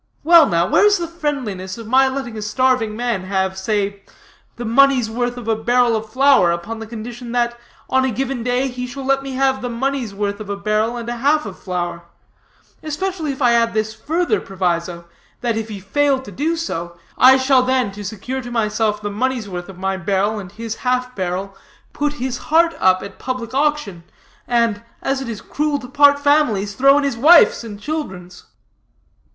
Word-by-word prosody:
Well, 330 -1 +7
now, 170 0 +2
where - - +3
is 410 0 +5
the 340 -1 -3
friendliness 260 - -4
of 230 - -8
my 260 +4 +4
letting 265 -3 -4
a 215 - -5
starving 225 0 +1
man 235 -5 -2
have, 190 0 -1
say, 200 0 -2 0.5
the 240 - -6
money's 255 -1 +3
worth 245 +1 -2
of 240 -2 -8
a 225 - +2
barrel 240 +1 +2
of 220 0 -4
flour 270 -7 +4
upon 200 +7 -4
the 225 - -7
condition 235 +2 -7
that, 240 -1 +1 0.3
on 260 0 +2
a 265 - +1
given 265 +1 -3
day, 250 +2 0
he 250 -1 -5
shall 270 +1 -7
let 275 0 +2
me 270 -1 -6
have 265 0 +1
the 245 - -3
money's 255 -1 -2
worth 200 0 -2
of 210 -2 -8
a 200 - -3
barrel 215 +3 0
and 235 -1 -6
a 240 0 -3
half 290 +4 +2
of 195 -3 -8
flour; 175 -2 -4 0.8
especially 315 0 -3
if 270 0 -4
I 240 -1 +5
add 230 -1 +2
this 215 0 -1
further 335 - -1
proviso, 175 -2 -2 0.4
that 235 -2 0
if 225 0 -4
he 205 -2 -6
fail 275 +9 +1
so 260 - -9
to 205 - -10
do, 315 - -1 0.6
I 260 +1 +7
shall 260 0 +4
then, 255 -4 +1
to 205 +1 -9
secure 225 +6 -5
to 245 - -8
myself 215 -2 -1
the 205 - -3
money's 245 +1 -1
worth 180 -1 -6
of 190 - -11
my 190 +1 -2
barrel 200 +3 0
and 190 -2 -9
his 225 +1 -6
half 250 0 -1
barrel, 190 +1 -3 0.4
put 295 0 -1
his 255 -2 -4
heart 335 +2 +4
up 185 0 +3
at 200 -1 -10
public 255 -2 -4
auction, 270 - -1 0.4
and, 230 -4 +1 0.2
as 270 0 -1
it 260 - -5
is 220 -3 -6
cruel 300 0 -1
to 260 -3 -9
part 285 +1 +5
families, 285 -9 +2
throw 275 +5 +5
in 290 - +1
his 275 -4 -1
wife's 315 +1 +6
and 210 -3 -8
children's?" 190 - -6
235 Hz, 200 wpm, -19 LUFS, 205-270 Hz, 0.8 s, Well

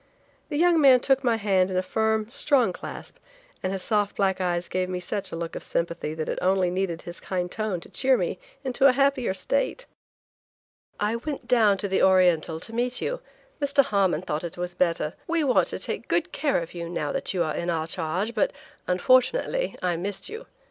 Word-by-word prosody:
The 295 - -2
young 340 0 +4
man 265 -3 +7
took 270 +1 +2
my 240 -2 +3
hand 195 -4 +2
in 185 - -2
a 185 - +1
firm, 220 +2 0
strong 250 -4 +2
clasp, - - -9 0.4
and 185 - -1
his 195 -1 -3
soft 210 -2 0
black 190 -1 +1
eyes 175 -1 -1
gave 185 0 -1
me 180 -1 -2
such 195 +3 -4
a - - -4
look 165 0 -5
of - - -5
sympathy 170 -2 -3
that 160 -1 -3
it - - -2
only 185 -1 +2
needed 180 -3 -2
his 175 0 -7
kind 180 -1 -3
tone 215 -5 -2
to - - -9
cheer 260 -1 +2
me - - -2 0.2
into 265 +1 +3
a 260 - +5
happier 270 -6 +1
state. - - -1 1.1
"I 210 +3 0
went 275 0 -6
down 220 -5 +4
to 200 - -2
the 190 - +1
Oriental 175 -4 +4
to 225 - -5
meet 245 +2 -1
you; - - -3 0.4
Mr. 280 0 +4
Harmon 195 -7 +1
thought 155 -3 -3
it 170 0 -6
was 175 0 -4
better. 170 -3 0
We 335 -1 +1
want 260 -4 +3
to - - -2
take - - -3
good - - 0
care 280 - 0
of 165 - -11
you 170 -1 -5
now 150 -4 -2
that - - -2
you 175 - +2
are 155 -2 -2
in 170 - -3
our 160 -2 0
charge, 180 +6 -2
but, - - +1 0.4
unfortunately, 255 - +2
I 175 -2 +1
missed 195 - -4
you. 450 +3 -8
195 Hz, 210 wpm, -25 LUFS, 175-255 Hz, 1.1 s, man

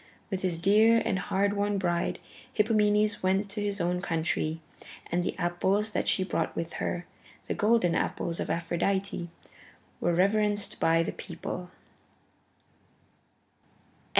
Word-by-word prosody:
With 190 -1 -2
his 175 -3 -1
dear 215 +5 +5
and 190 - 0
hard 200 +1 +1
won 205 0 0
bride, 175 -3 0 0.4
Hippomenes 210 -1 +2
went 195 +2 +1
to 210 +1 -3
his 205 -1 -1
own 180 +1 0
country, 165 -2 -1 0.5
and 175 0 +1
the - - -3
apples 190 +5 +1
that - - -1
she 190 - +2
brought 170 -3 -2
with 165 0 -4
her, 175 0 -2 0.4
the - - -2
golden 210 -5 +3
apples 170 0 -1
of - - -3
Aphrodite, 175 +2 -1 0.7
were 175 -1 +1
reverenced 205 +2 +2
by 165 0 +3
the - - -3
people. 180 0 -6
190 Hz, 130 wpm, -28 LUFS, 175-205 Hz, 0.7 s, dear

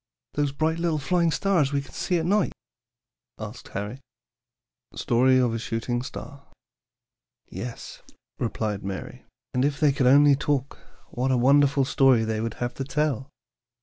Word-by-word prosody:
"Those 145 -1 0
bright 160 +3 -1
little 170 -2 0
flying 170 +4 +1
stars 170 -5 +1
we 140 - +1
can 140 - -9
see 180 - -1
at 160 - -1
night?" 200 +2 +1 0.8
asked 110 +2 -8
Harry. 105 +6 -5 1.0
STORY 130 +2 +3
OF 125 -3 +2
A 115 - -2
SHOOTING 115 +2 -2
STAR. 140 +2 -8 1.1
"Yes," 120 -1 -7 0.4
replied 110 -4 -2
Mary; 95 -1 -6 0.3
"and 125 - +1
if 145 +1 0
they 150 -2 +4
could 135 -2 +1
only 145 +2 +6
talk, 140 -1 -2 0.3
what 125 +2 -1
a 130 - +2
wonderful 140 +2 +4
story 130 -3 +4
they 110 -1 -2
would 115 -1 -3
have 120 0 -3
to 135 - -4
tell! 140 -1 -1
135 Hz, 150 wpm, -25 LUFS, 120-145 Hz, 1.1 s, only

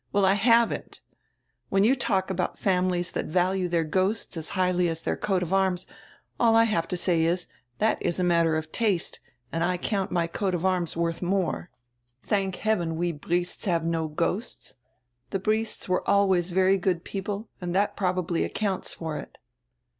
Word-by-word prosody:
Well, 200 -1 +3
I 190 - +5
haven't 230 +3 +2 0.7
When 195 0 +3
you 235 +5 +5
talk 195 -7 0
about 180 -1 -2
families 180 -2 +1
diat - - -2
value 180 +2 +1
dieir 165 -2 +1
ghosts 190 +6 0
as 160 -1 -6
highly 180 -1 +2
as 165 0 -3
dieir - - 0
coat 195 -3 +1
of 175 +2 -3
arms, 190 -2 +1 0.5
all 230 -2 +5
I 225 - +7
have 190 -7 0
to 180 - -3
say 170 -2 +2
is, 175 +2 +1 0.3
diat 220 - +2
is 175 - 0
a - - +2
matter 170 -2 +3
of 155 0 -5
taste, 205 -7 0 0.3
and 165 0 -1
I 180 +1 +1
count 195 +1 -1
my 175 -2 +1
coat 185 +2 -1
of 175 +1 -2
arms 180 -3 0
wordi 170 0 -1
more. 180 -1 -1 0.5
Thank 195 -3 0
heaven, 180 -7 0
we 175 +1 -1
Briests 175 +4 -2
have 170 -4 +1
no 165 -1 0
ghosts. 170 +8 -3 0.6
The 195 - -1
Briests 215 +2 -1
were 185 -1 0
always 190 -3 +3
very 190 +2 +3
good 180 -2 0
people 200 +2 -4
and 175 0 -3
diat 200 +2 +2
probably 180 -3 0
accounts 200 -4 -2
for 160 -2 -4
it." - - -11
185 Hz, 180 wpm, -26 LUFS, 170-195 Hz, 0.7 s, I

